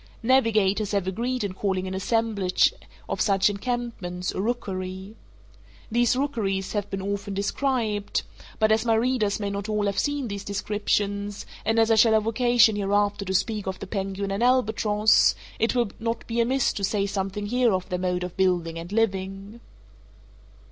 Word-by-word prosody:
Navigators 215 -5 +2
have 200 -2 +1
agreed 240 +6 -2
in 200 -2 -3
calling 190 -1 -1
an 185 - -4
assemblage 200 -1 +1 0.3
of - - -2
such 195 0 +3
encampments 200 -5 -3
a - - -3
rookery. 190 -3 -4 0.8
These 240 +1 +3
rookeries 220 -9 -1
have 205 -2 -2
been 195 -1 -4
often 200 0 -3
described, 215 0 -1 0.3
but 215 -1 +3
as 220 0 +3
my 230 -2 +2
readers 225 -3 +1
may 200 -1 -2
not 200 +1 -4
all 210 -1 0
have 200 -1 0
seen 290 -3 -1
these 200 -1 -5
descriptions, 205 0 -2 0.2
and 225 - +1
as 225 0 +4
I - - +6
shall 220 +1 +6
have 215 -1 +3
occasion 235 -1 +4
hereafter 205 0 +1
to 190 - -2
speak 210 0 0
of 190 0 -3
the - - -7
penguin 195 0 -3
and 195 +3 -2
albatross, 220 -3 +3 0.2
it 225 +3 +1
will 240 -5 +1
not 230 0 -3
be 235 0 0
amiss 260 +2 +1
to 200 - -5
say 200 +1 +1
something 195 +1 -3
here 245 +2 +2
of 185 -1 -1
their 180 - -2
mode 180 0 -1
of 180 -1 -6
building 175 -3 +1
and 170 +2 -8
living. 195 0 -2
205 Hz, 170 wpm, -25 LUFS, 195-230 Hz, 0.8 s, I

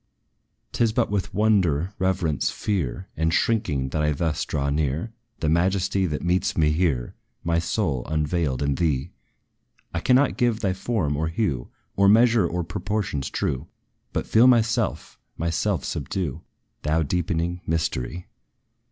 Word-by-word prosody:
'T - - +1
is 115 - +3
but - - +1
with 100 -2 -1
wonder, 95 -5 +2
reverence, 90 -6 +1
fear 95 - -2
And 80 0 +1
shrinking, 85 - +1
that 75 - -1
I 75 0 +2
thus 80 +1 -1
draw 70 -2 -1
near 75 - -1 0.3
The 80 - 0
majesty, 95 +3 +2
that 75 -2 -3
meets 90 +1 +1
me 75 -2 +4
here, 75 -7 0 0.3
My 85 0 +1
soul, 80 - -1
unveiled, 75 -2 0
in 70 0 +1
thee! 70 -4 0 0.8
I 85 - 0
cannot 130 +8 +3
give 120 -2 +1
thy 95 -3 +1
form, 95 -7 -1
or 80 +2 -1
hue, 80 - -1 0.3
Or 100 0 +5
measure, 115 -2 +5
or 90 +1 -2
proportions 95 -6 -2
true; 65 - -2 0.4
But - - -2
feel 115 +3 +5
myself 115 -3 +1 0.2
myself 85 +1 -1
subdue, 90 -9 -3 0.4
Thou 80 +2 +1
deepening 85 +2 -1
mystery. 80 0 -2
85 Hz, 145 wpm, -24 LUFS, 75-100 Hz, 0.8 s, Or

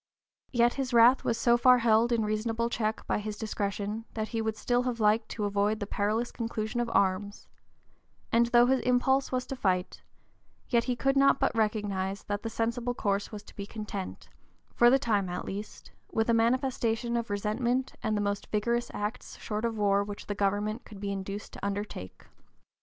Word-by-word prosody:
Yet 240 -1 +3
his 265 -3 -2
wrath 235 +3 +6
was 230 - 0
so 240 -1 +4
far 250 +1 +6
held 230 0 +3
in 225 -2 +2
reasonable 225 +2 -1
check 220 -1 -2
by - - 0
his 210 0 -5
discretion 210 0 -3
that 220 -1 -2
he 225 -2 -2
would 220 -1 -2
still 245 +2 +1
have 250 -2 -2
liked 215 +1 +2
to 210 - -3
avoid 205 +1 +1
the 205 - -3
perilous 215 +4 -1
conclusion 225 0 -3
of 240 - -2
arms, 200 +2 0 0.8
and 235 +1 +4
though 240 0 +5
his 260 +1 +3
impulse 255 +2 +2
was 255 -1 -1
to 270 - -5
fight, 185 -6 -1 0.7
yet 235 -3 +2
he 250 - 0
could 270 +3 +1
not 275 0 +5
but - - +1
recognize 205 -3 -1
that 205 0 -3
the 225 - -4
sensible 235 +2 -1
course 200 -2 -1
was 210 -1 -7
to - - -16
be 200 -1 -6
content, 210 -3 -6 0.5
for 240 - +6
the 265 - +6
time 210 -7 0
at 175 - -4
least, 205 +2 -7 0.2
with 225 +1 +1
a - - +3
manifestation 235 -1 +1
of 235 -1 -2
resentment, 235 +5 -1
and 215 -1 0
the - - 0
most 200 0 -2
vigorous 235 +3 0
acts 210 +3 -4
short 215 +1 -3
of 230 -1 -2
war 200 -1 +3
which 205 0 -7
the 205 - -3
government 205 +3 -1
could 210 -3 -12
be 200 0 -3
induced 195 +1 -5
to - - -11
undertake. 200 - -5
220 Hz, 190 wpm, -29 LUFS, 205-240 Hz, 0.8 s, wrath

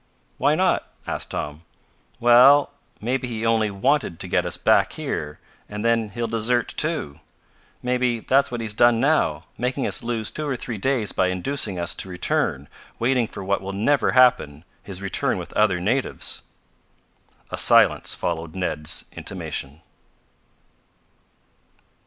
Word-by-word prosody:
"Why - - +3
not?" - - 0
asked - - -2
Tom. 75 +2 -5 0.6
"Well, 125 +5 +6 0.3
maybe 125 +3 -2
he 115 -2 -4
only 110 -2 +2
wanted 100 - 0
to - - -5
get - - 0
us - - -2
back - - +3
here, 75 0 -4 0.3
and 105 +2 -5
then 115 -2 +1
he'll 115 +3 -4
desert, 115 +2 0
too. 150 - -1 0.6
Maybe 125 -1 0
that's 135 +4 +2
what 120 -1 -4
he's 110 -2 -3
done 120 +1 +4
now, 115 - +1
making 125 +2 -1
us - - +2
lose 115 -2 -2
two 155 -1 -4
or 140 - -1
three 120 -3 -6
days 125 -3 0
by 95 - +1
inducing 95 +2 -1
us 85 - 0
to 95 - -3
return, 75 -5 -1 0.3
waiting 120 -1 +1
for 100 - -8
what 100 +1 -1
will 100 +1 -6
never 125 +9 +1
happen 105 - +3 0.2
his 95 -1 -7
return 95 -3 0
with - - -8
other 100 -4 +2
natives." 120 +9 -1 1.1
A - - -4
silence - - +4
followed 80 -1 -4
Ned's 85 -2 -1
intimation. 80 -4 -5
110 Hz, 145 wpm, -23 LUFS, 90-125 Hz, 1.1 s, Well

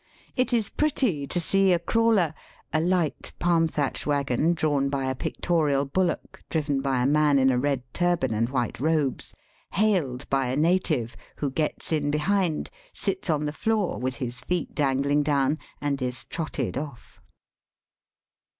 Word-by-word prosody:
It 255 -1 +1
is 230 -4 +2
pretty 245 - 0
to 175 - 0
see 195 +3 +3
a 175 - +5
crawler 205 -3 +2 0.2
— - - -32
a 155 - +3
light, 175 -2 0
palm 170 -1 +3
thatched 150 -3 -2
waggon, 145 +3 +1
drawn 145 -4 +1
by 135 -1 -1
a 130 - 0
pictorial 145 0 0
bullock, 180 +6 -2
driven 145 -4 0
by 135 -2 +1
a - - +2
man 150 0 +4
in 130 0 +4
a 125 - +1
red 140 -1 0
turban 175 -9 +1
and 115 +2 0
white 130 -3 -2
robes 150 -2 0 0.2
— - - -36
hailed 175 -11 +1
by 135 -2 +1
a 125 - -1
native, 155 -7 +1 0.2
who 140 -2 -2
gets 155 +4 -2
in 150 -2 +1
behind, 165 +2 0 0.2
sits 375 - -2
on 150 -1 +1
the 150 - -2
floor, 215 0 0
with 130 +1 -2
his 125 -1 -4
feet 175 +7 -2
dangling 140 0 +2
down, 145 0 +1 0.2
and 140 -2 -2
is 125 -1 -1
trotted 145 -6 -3
off. 145 -4 -9
150 Hz, 165 wpm, -26 LUFS, 135-175 Hz, 0.2 s, a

